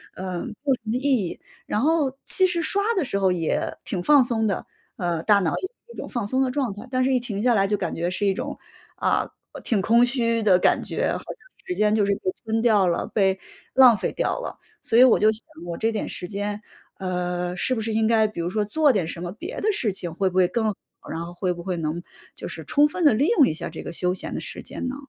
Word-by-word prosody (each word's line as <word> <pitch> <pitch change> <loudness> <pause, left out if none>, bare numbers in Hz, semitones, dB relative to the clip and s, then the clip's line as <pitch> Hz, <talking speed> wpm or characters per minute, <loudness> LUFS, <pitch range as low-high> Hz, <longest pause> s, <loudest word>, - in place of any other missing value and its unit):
呃， 185 -1 -4
没 235 - -6
有 280 -2 +3
什 235 - -21
么 220 +2 -1
意 - - 0 0.3
义。 - - -7 0.3
然 210 - -1
后， 290 -3 +1
其 375 -1 +3
实 350 -2 -1
刷 400 +5 +2 0.2
的 365 - +2
时 200 -7 -2
候 190 -1 +3
也 165 -3 -1
挺 180 - -3
放 285 +4 +6
松 225 -2 0
的， 195 - -2 0.3
呃， 175 -3 -2
大 205 -2 +5
脑 170 -4 0
也 375 - -3
是 475 +1 -19
一 - - -15
种 - - -5
放 240 -4 -3
松 260 +6 0
的 265 - +2
状 255 -3 -1
态。 205 +5 -10
但 255 0 +1
是 265 - +2
一 255 - +3
停 215 -5 -4
下 245 +1 +3
来 195 -2 +3
就 210 - +1
感 - - -3
觉 170 +2 -1
是 205 +3 -2
一 195 - +3
种， - - -5 0.4
啊， - - 0 0.3
挺 210 -5 0
空 235 +4 +5
虚 230 -2 0
的 195 -4 +5
感 - - +3
觉， - - -1
好 - - -1
像 - - -12 0.4
时 360 - -2
间 215 -5 +2
就 210 - +3
是 200 - +2
被 185 - -2
吞 225 0 0
掉 210 -5 +4
了， 170 - 0
被 190 -2 +1 0.4
浪 255 -4 +7
费 - - -2
掉 - - 0
了。 - - -6 0.2
所 225 - +1
以 - - +10
我 255 - +6
就 215 +1 +5
想 220 +1 -4 0.2
我 170 - -4
这 225 - +1
点 220 - -3
时 180 - -5
间， 205 +1 -4 0.4
呃， 180 -1 -2
是 255 - +1
不 225 - -2
是 225 - -2
应 220 0 +2
该 220 -1 +4
比 210 -4 -8
如 170 +1 -1
说 210 0 0
做 285 +7 +3
点 180 -6 0
什 170 - -6
么 175 - -4
别 345 - -7
的 430 - +2
事 230 - 0
情， 175 -3 -5
会 190 +2 +1
不 180 - -11
会 185 - +5
更 220 +5 -1
好？ 215 - 0 0.4
然 165 +1 -4
后 175 - -9
会 180 +1 -1
不 175 - -8
会 185 0 -2
能 165 +1 -2 0.3
就 - - -7
是 - - -7
充 295 +1 +4
分 345 +4 -3
地 290 - +7
利 265 +8 +2
用 285 - +7
一 - - 0
下 155 - -5
这 160 - -8
个 - - -6
休 180 +1 0
闲 185 - -5
的 - - -3
时 - - -5
间 255 - -5
呢？ 260 - -3
215 Hz, 290 characters per minute, -24 LUFS, 185-255 Hz, 0.4 s, 以